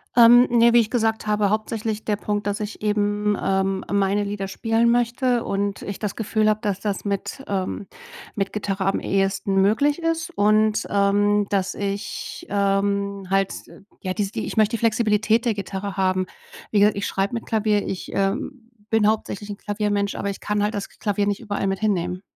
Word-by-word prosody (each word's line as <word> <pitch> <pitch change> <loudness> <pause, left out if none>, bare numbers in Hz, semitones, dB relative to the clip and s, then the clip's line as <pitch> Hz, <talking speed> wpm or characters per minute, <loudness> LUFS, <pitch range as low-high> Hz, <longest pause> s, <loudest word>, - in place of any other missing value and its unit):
Ähm, 240 +1 +8
ne, 235 0 +5
wie 240 - +7
ich 220 -1 0
gesagt 225 -3 0
habe, 210 -1 +1
hauptsächlich 215 0 -2
der 210 -2 0
Punkt, 205 -1 -2
dass 205 0 -1
ich 210 0 -6
eben, 210 0 +1
ähm, 190 0 0
meine 200 0 +2
Lieder 200 -1 -3
spielen 225 +4 +1
möchte 240 +1 +1
und 200 0 -2
ich 200 - -5
das 210 -2 -4
Gefühl 215 -1 0
habe, 215 - +1
dass 200 -2 -1
das 205 -2 -3
mit, 200 +7 -3
ähm 195 0 -3 0.5
mit 195 -1 -2
Gitarre 195 -2 -2
am 195 - +1
ehesten 195 0 0
möglich 285 - +2
ist. 330 +1 -1
Und, 215 +1 +3
ähm, 205 +1 +2
dass 195 -2 0
ich, 200 0 -5
ähm, 200 0 0
halt, 195 0 +2 0.5
ja, 185 -1 -2
dies 200 0 -2
die - - -3
ich - - -5
möchte 215 +1 +3
die 225 - -4
Flexibilität 220 0 +2
der 235 - +2
Gitarre 195 0 -5
haben. 185 -1 +1 0.4
Wie 210 - +3
gesagt, 205 0 +4
ich 200 - -1
schreibe 195 +3 -1
mit 230 - -4
Klavier, 215 -2 +1
ich, 185 - -5
ähm, 230 +4 -2 0.2
bin 220 -2 +4
hauptsächlich 210 -1 -2
'n 205 - -5
Klaviermensch, 205 -1 -1
aber 200 - -3
ich 195 - -5
kann 210 0 -1
halt 210 +2 0
das 200 - -4
Klavier 205 -1 0
nicht 205 0 -1
überall 205 -4 -3
mit 195 0 -1
hinnehmen. 180 -4 -1
205 Hz, 190 wpm, -23 LUFS, 200-220 Hz, 0.5 s, Ähm